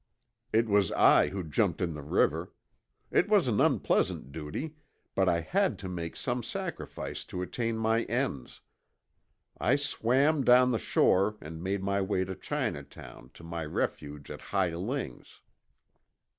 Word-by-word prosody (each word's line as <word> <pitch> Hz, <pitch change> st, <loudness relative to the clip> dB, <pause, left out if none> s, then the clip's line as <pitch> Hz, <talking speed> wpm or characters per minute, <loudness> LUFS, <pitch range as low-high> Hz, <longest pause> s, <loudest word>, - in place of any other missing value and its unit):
It 115 Hz, +1 st, +3 dB
was 100 Hz, -3 st, +3 dB
I -, -, +6 dB
who 95 Hz, -1 st, -4 dB
jumped 75 Hz, -3 st, 0 dB
in 85 Hz, -2 st, -1 dB
the 75 Hz, -, -7 dB
river. 70 Hz, -, +1 dB, 0.6 s
It -, -, +3 dB
was -, -, +4 dB
an -, -, +2 dB
unpleasant 70 Hz, -, +1 dB
duty, 80 Hz, -, -5 dB, 0.4 s
but -, -, +3 dB
I 85 Hz, -1 st, +2 dB
had 195 Hz, -, +1 dB
to 100 Hz, -, -7 dB
make 85 Hz, -2 st, -5 dB
some 125 Hz, -1 st, -2 dB
sacrifice -, -, -5 dB
to 90 Hz, -, -4 dB
attain 115 Hz, +4 st, -2 dB
my 110 Hz, +1 st, +2 dB
ends. 120 Hz, -, -3 dB, 1.0 s
I 125 Hz, -, +3 dB
swam 140 Hz, +1 st, +2 dB
down 125 Hz, +1 st, +6 dB
the 115 Hz, -, +1 dB
shore 100 Hz, +3 st, +2 dB
and 80 Hz, +2 st, -8 dB
made 95 Hz, +1 st, -2 dB
my 100 Hz, 0 st, +1 dB
way 95 Hz, -1 st, 0 dB
to 95 Hz, -, -5 dB
Chinatown -, -, -5 dB
to -, -, -13 dB
my 85 Hz, 0 st, -4 dB
refuge 75 Hz, -1 st, -4 dB
at -, -, -8 dB
Hi 95 Hz, -4 st, 0 dB
Ling's. 95 Hz, -, -5 dB
100 Hz, 150 wpm, -29 LUFS, 85-120 Hz, 1.0 s, I